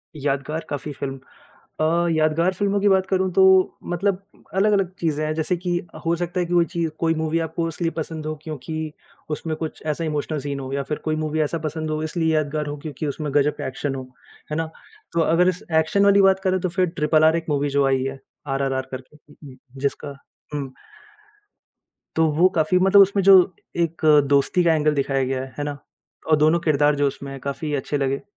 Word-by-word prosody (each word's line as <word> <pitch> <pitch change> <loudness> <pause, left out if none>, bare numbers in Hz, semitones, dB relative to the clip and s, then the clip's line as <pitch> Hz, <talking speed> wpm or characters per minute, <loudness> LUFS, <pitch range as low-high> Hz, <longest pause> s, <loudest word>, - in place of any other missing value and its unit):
यादगार 145 +2 -2
काफ़ी 145 +1 -4
फ़िल्म 135 -1 -5 0.6
अ, 170 +2 +2
यादगार 160 +3 +2
फ़िल्मों 200 +1 0
की 205 - +3
बात 190 -1 +3
करूँ 190 -1 +1
तो 190 +2 +5 0.4
मतलब 190 +2 -1 0.3
अलग-अलग 195 -2 +2
चीज़ें 155 -2 -1
हैं, 155 - -1
जैसे 160 +3 0
कि 180 0 -3 0.3
हो 170 +1 +2
सकता 175 +1 -3
है 175 - +1
कि 175 - -4
कोई 170 -1 +4
चीज़ 165 -1 -2
कोई 165 -1 +2
मूवी 160 +1 0
आपको 165 +1 -2
इसलिए 165 +1 -2
पसंद 160 -1 -4
हो 155 0 -3
क्योंकि 155 +1 -5 0.4
उसमें 155 +1 -3
कुछ 160 -1 -6
ऐसा 155 +2 -2
इमोशनल 150 0 -2
सीन 140 0 -4
हो 130 0 -6
या 140 - -1
फिर 150 +2 -3
कोई 155 0 0
मूवी 155 0 -2
ऐसा 155 +3 -1
पसंद 155 +1 -4
हो, 155 0 -2
इसलिए 160 0 0
यादगार 150 0 -1
हो 145 - -4
क्योंकि 150 0 -5
उसमें 145 0 -4
ग़ज़ब 145 +1 +3
का - - -4
एक्शन 135 +1 -3
हो। 130 - -5 0.5
है 150 - -1
ना? 165 - 0 0.5
तो 170 - +2
अग़र 170 +3 +3
इस 185 +4 -4 0.2
एक्शन 200 +6 +1
वाली 200 0 +6
बात 190 0 +4
करें 185 -1 +1
तो 185 - -1
फिर 185 +1 +1
ट्रिपल 155 +1 +3
आर 160 +1 +5
एक 165 - -4
मूवी 145 -1 0
जो 140 0 +2
आई 135 -1 +1
है, 135 0 -4 0.3
आरआरआर 135 -1 -1
करके 140 +1 -11 0.3
जिसका 140 0 -3 0.4
हुँ। 140 -3 -4 1.5
तो 160 0 +4
वो 175 +5 +4
काफ़ी 160 +3 +3
मतलब 195 +2 +7
उसमें 195 0 +2
जो 195 0 +9 0.4
एक 165 -1 -1 0.3
दोस्ती 140 +5 +3
का 165 -1 +4
एंगल 150 -1 +2
दिखाया 135 -1 0
गया 130 0 -2
है। 130 - -13
है 145 - -1
ना? 145 -1 -4 0.5
अ, 155 - +7
दोनों 155 +3 +3
क़िरदार 150 -2 +3
जो 145 0 +2
उसमें 135 0 -7
काफ़ी 145 +3 -4
अच्छे 145 +1 -2
लगे 135 0 -1
155 Hz, 205 wpm, -22 LUFS, 145-170 Hz, 1.5 s, जो